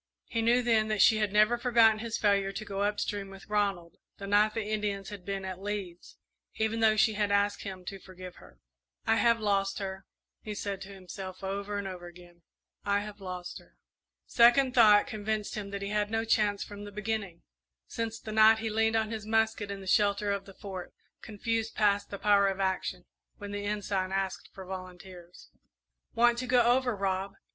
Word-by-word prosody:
He 230 Hz, -, -2 dB
knew 240 Hz, +2 st, +3 dB
then 225 Hz, -2 st, +2 dB
that 215 Hz, -1 st, -1 dB
she 220 Hz, -, +6 dB
had 210 Hz, -2 st, 0 dB
never 215 Hz, +3 st, +4 dB
forgotten 230 Hz, -3 st, +4 dB
his 230 Hz, 0 st, -3 dB
failure 200 Hz, -2 st, +2 dB
to 215 Hz, +2 st, -6 dB
go 200 Hz, -1 st, -4 dB
up 205 Hz, 0 st, 0 dB
stream 200 Hz, -2 st, -3 dB
with 195 Hz, 0 st, -12 dB
Ronald 200 Hz, -5 st, -1 dB, 0.2 s
the 200 Hz, -, -7 dB
night 210 Hz, +2 st, +3 dB
the 225 Hz, -, -1 dB
Indians 210 Hz, -2 st, -2 dB
had 205 Hz, -3 st, -9 dB
been 195 Hz, 0 st, -4 dB
at 185 Hz, 0 st, -6 dB
Lee's, 195 Hz, -4 st, -6 dB, 0.4 s
even 220 Hz, +1 st, -1 dB
though 220 Hz, -1 st, +4 dB
she 215 Hz, +1 st, +3 dB
had 205 Hz, -1 st, 0 dB
asked 205 Hz, 0 st, +1 dB
him 185 Hz, -2 st, -7 dB
to 195 Hz, +1 st, -6 dB
forgive 185 Hz, -1 st, -11 dB
her. -, -, -17 dB, 0.5 s
"I 225 Hz, -, +3 dB
have 230 Hz, -1 st, +3 dB
lost 195 Hz, -2 st, 0 dB
her," 190 Hz, -1 st, -6 dB, 0.3 s
he 210 Hz, -1 st, -6 dB
said 200 Hz, -1 st, -4 dB
to 195 Hz, -, -8 dB
himself, 190 Hz, 0 st, -9 dB
over 200 Hz, +1 st, -3 dB
and 200 Hz, -1 st, -3 dB
over 180 Hz, -2 st, -7 dB
again, 175 Hz, 0 st, -15 dB, 0.4 s
"I 200 Hz, 0 st, +1 dB
have 210 Hz, 0 st, -9 dB
lost 180 Hz, -1 st, -6 dB
her." -, -, -23 dB, 0.5 s
Second 245 Hz, +2 st, +5 dB
thought 210 Hz, -4 st, +6 dB
convinced 215 Hz, -3 st, -3 dB
him 205 Hz, -2 st, -5 dB
that 200 Hz, 0 st, -5 dB
he 200 Hz, -, -3 dB
had 210 Hz, -, -1 dB
had 205 Hz, 0 st, 0 dB
no 225 Hz, +1 st, -1 dB
chance 210 Hz, -2 st, +1 dB
from 205 Hz, 0 st, -9 dB
the 205 Hz, -, -8 dB
beginning 210 Hz, -4 st, -4 dB, 0.4 s
since 225 Hz, -1 st, -4 dB
the 215 Hz, -, -8 dB
night 220 Hz, +1 st, +6 dB
he 220 Hz, 0 st, -3 dB
leaned 225 Hz, +1 st, +2 dB
on 220 Hz, 0 st, 0 dB
his 215 Hz, -2 st, -5 dB
musket 220 Hz, -2 st, +1 dB
in 200 Hz, -1 st, -5 dB
the -, -, -10 dB
shelter 200 Hz, +1 st, +2 dB
of 200 Hz, -1 st, -3 dB
the 195 Hz, -, -13 dB
Fort; 190 Hz, -3 st, -8 dB, 0.3 s
confused 225 Hz, +1 st, -3 dB
past 205 Hz, -1 st, +2 dB
the 200 Hz, -, -6 dB
power 200 Hz, -1 st, +4 dB
of 195 Hz, 0 st, -2 dB
action, 190 Hz, -1 st, -2 dB, 0.3 s
when 205 Hz, -1 st, -8 dB
the 205 Hz, 0 st, -4 dB
Ensign 200 Hz, -2 st, -2 dB
asked 195 Hz, 0 st, -3 dB
for 190 Hz, -, -10 dB
volunteers. 185 Hz, -1 st, -10 dB, 0.6 s
"Want 235 Hz, 0 st, +4 dB
to 255 Hz, -, -4 dB
go 245 Hz, -1 st, +4 dB
over, 245 Hz, 0 st, +2 dB
Rob?" 195 Hz, 0 st, -2 dB
205 Hz, 205 wpm, -29 LUFS, 195-220 Hz, 0.6 s, she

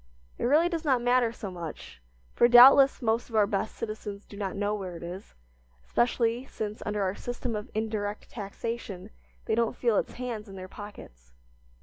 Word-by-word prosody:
It -, -, -1 dB
really 305 Hz, +7 st, +4 dB
does 335 Hz, -2 st, -3 dB
not 265 Hz, -5 st, +3 dB
matter 245 Hz, -1 st, +3 dB
so 205 Hz, -4 st, -7 dB
much, 170 Hz, -, -8 dB, 0.3 s
for 240 Hz, -, +5 dB
doubtless 265 Hz, +3 st, +8 dB
most 230 Hz, +2 st, 0 dB
of 225 Hz, -, -7 dB
our 210 Hz, -1 st, +5 dB
best 200 Hz, +1 st, -2 dB
citizens 215 Hz, -2 st, -6 dB
do -, -, -13 dB
not 200 Hz, -2 st, -4 dB
know 205 Hz, +1 st, 0 dB
where 190 Hz, -4 st, -5 dB
it 170 Hz, -, -10 dB
is, 175 Hz, -, -8 dB, 0.5 s
especially 240 Hz, -, +1 dB
since, 210 Hz, -4 st, -5 dB
under 210 Hz, -1 st, 0 dB
our 185 Hz, -1 st, 0 dB
system 245 Hz, +1 st, -4 dB
of 210 Hz, 0 st, -5 dB
indirect 215 Hz, -1 st, -3 dB
taxation, 205 Hz, -2 st, -6 dB, 0.3 s
they -, -, 0 dB
don't 230 Hz, 0 st, +1 dB
feel 235 Hz, -4 st, +1 dB
its -, -, -1 dB
hands 235 Hz, -4 st, -5 dB
in 195 Hz, -, -10 dB
their 185 Hz, -1 st, -7 dB
pockets. -, -, -12 dB
215 Hz, 185 wpm, -28 LUFS, 200-240 Hz, 0.5 s, doubtless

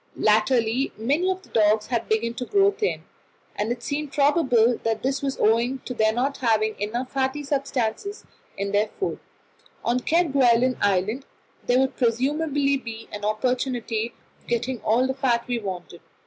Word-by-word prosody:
Latterly 225 Hz, +4 st, +2 dB
many 285 Hz, +12 st, +1 dB
of 375 Hz, 0 st, -2 dB
the -, -, -19 dB
dogs 215 Hz, -1 st, +3 dB
had 235 Hz, -3 st, -2 dB
begun 230 Hz, +2 st, +1 dB
to 250 Hz, +1 st, -5 dB
grow 400 Hz, 0 st, +4 dB
thin, 425 Hz, +1 st, -2 dB, 0.5 s
and 210 Hz, +3 st, -1 dB
it 240 Hz, 0 st, -4 dB
seemed 290 Hz, +1 st, -3 dB
probable 265 Hz, -6 st, +3 dB
that 225 Hz, -1 st, -1 dB
this 270 Hz, +1 st, 0 dB
was 275 Hz, -1 st, -2 dB
owing 235 Hz, +4 st, +2 dB
to 250 Hz, -, -4 dB
their 220 Hz, -2 st, +2 dB
not 260 Hz, +5 st, -1 dB
having 220 Hz, -3 st, +1 dB
enough 240 Hz, +5 st, -3 dB
fatty 270 Hz, +2 st, -1 dB
substances 275 Hz, -, -2 dB, 0.3 s
in 200 Hz, 0 st, -2 dB
their 205 Hz, +1 st, +2 dB
food; 390 Hz, -, -2 dB, 0.7 s
on 240 Hz, +2 st, +2 dB
Kerguelen 260 Hz, -6 st, +3 dB
Island 205 Hz, +6 st, 0 dB, 0.4 s
there 245 Hz, -, +4 dB
would 265 Hz, 0 st, +1 dB
presumably 275 Hz, +4 st, +1 dB
be 230 Hz, -3 st, -8 dB
an 205 Hz, 0 st, -7 dB
opportunity 235 Hz, +1 st, -1 dB, 0.2 s
of -, -, -30 dB
getting 240 Hz, +1 st, -1 dB
all 235 Hz, +4 st, +2 dB
the 265 Hz, -, 0 dB
fat 260 Hz, -3 st, 0 dB
we 245 Hz, -1 st, -1 dB
wanted. 180 Hz, -4 st, -7 dB
245 Hz, 160 wpm, -24 LUFS, 220-275 Hz, 0.7 s, grow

